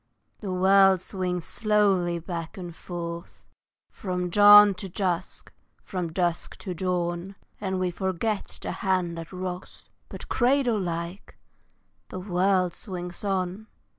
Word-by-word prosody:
THE 195 - -5
world 190 +1 +5
swings 180 -2 -3
slowly 200 -5 +2
back 170 +2 -6
and 175 -3 -7
forth, 170 -1 -7 0.5
From 180 -2 -3
dawn 205 +1 +9
to 195 +1 -7
dusk, 180 -1 -3 0.3
from 180 -3 -4
dusk 175 0 -1
to 185 - -5
dawn, 180 +1 -2 0.2
And 190 -2 -2
we 185 -1 0
forget 190 +4 -2
the - - -3
hand 185 -3 -1
that 165 - -9
rocks, 185 0 -7 0.2
But, - - -9
cradle 245 -3 +2
like, 170 +1 -5 0.7
the 185 - -6
world 185 -1 +1
swings 180 -3 -7
on. 195 +1 -2
185 Hz, 125 wpm, -26 LUFS, 175-195 Hz, 0.7 s, dawn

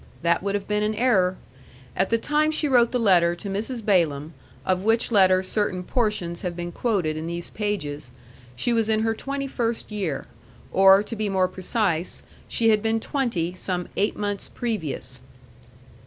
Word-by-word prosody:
That 170 0 +2
would 200 +1 -1
have 200 - -3
been 210 0 0
an 215 +1 0
error. 195 -6 +2 0.6
At 190 - +1
the 230 - +3
time 300 +5 +1
she 310 -1 0
wrote 240 -4 +4
the 250 - 0
letter 175 -6 +4
to 200 +3 -6
Mrs. 220 +3 -3
Balaam, 160 -6 +1 0.3
of 185 -1 +1
which 225 +3 +2
letter 185 -3 +5
certain 185 -1 -1
portions 185 -6 -1
have 180 -2 -3
been 175 0 -5
quoted 185 -8 0
in 160 +1 -4
these 170 0 -5
pages, 150 - -3 0.5
she 235 - +1
was 225 -1 +1
in 220 0 +2
her 225 0 +1
twenty 275 +4 -4
first 235 -4 -2
year; 190 -9 -3 0.5
or, 195 +1 +6
to 230 - -6
be 215 -1 -2
more 190 -1 +2
precise, 185 -2 -1 0.2
she 225 -1 +2
had 215 -1 +4
been 225 +1 +1
twenty 225 - -1
some 180 -1 -3
eight 205 - 0
months 205 -1 -3
previous. 150 - -3
200 Hz, 175 wpm, -24 LUFS, 175-225 Hz, 0.6 s, or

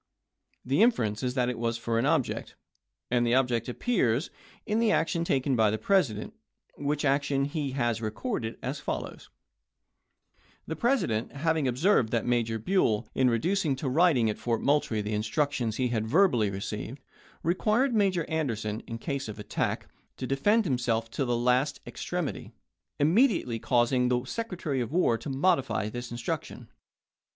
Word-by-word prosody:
The 135 +9 +2
inference 115 - +2
is 125 -1 -2
that 125 -2 +1
it 125 -2 -3
was 115 0 -1
for 115 0 -1
an 125 - +1
object, 150 -5 -1 0.6
and 120 -1 +3
the 120 +1 +2
ob 130 -1 +3
ject 115 0 -1
appears 135 - 0 0.3
in 215 +1 0
the 230 -2 +3
action 170 -3 +1
taken 135 -4 +1
by 110 -2 +4
the 110 - -1
President, 110 - +1 0.4
which 145 +1 -1
action 140 0 +1
he 145 -2 -3
has 120 -4 0
recorded 110 - -3
as 130 +4 -3
follows: - - -5 1.4
The - - -4
President 235 - 0
having 155 0 0
observed 125 - +2
that 115 -1 0
Major 115 -2 +1
Buell, 110 - +1
in 130 -1 +3
reducing 155 - +1
to 135 +2 -4
writing 140 -4 +3
at 105 - -2
Fort 115 -2 -1
Moultrie 140 -7 +1
the 105 +1 -3
instructions 115 +1 -1
he 125 -1 +1
had 110 -2 -1
verbally 125 - +3
received, 105 +6 -5 0.4
required 215 - +2
Major 190 -6 +1
Anderson, 115 -9 -2
in 115 - -5
case 140 +1 -4
of 110 0 -7
attack, 105 - -2 0.3
to 130 - -4
defend 200 - +2
himself 120 -5 0
to 135 - -1
the 120 -1 0
last 125 +4 +1
extremity, - - -4 0.5
immedi 190 - +4
ately 115 -2 -4
caused 120 0 +2
the 125 0 +2
Secretary 175 - -3
of 120 - -4
War 165 -8 +3
to 140 - -6
modify 135 - +1
this 120 +1 -6
instruc 120 -1 -3
tion. - - -12
130 Hz, 160 wpm, -28 LUFS, 115-160 Hz, 1.4 s, by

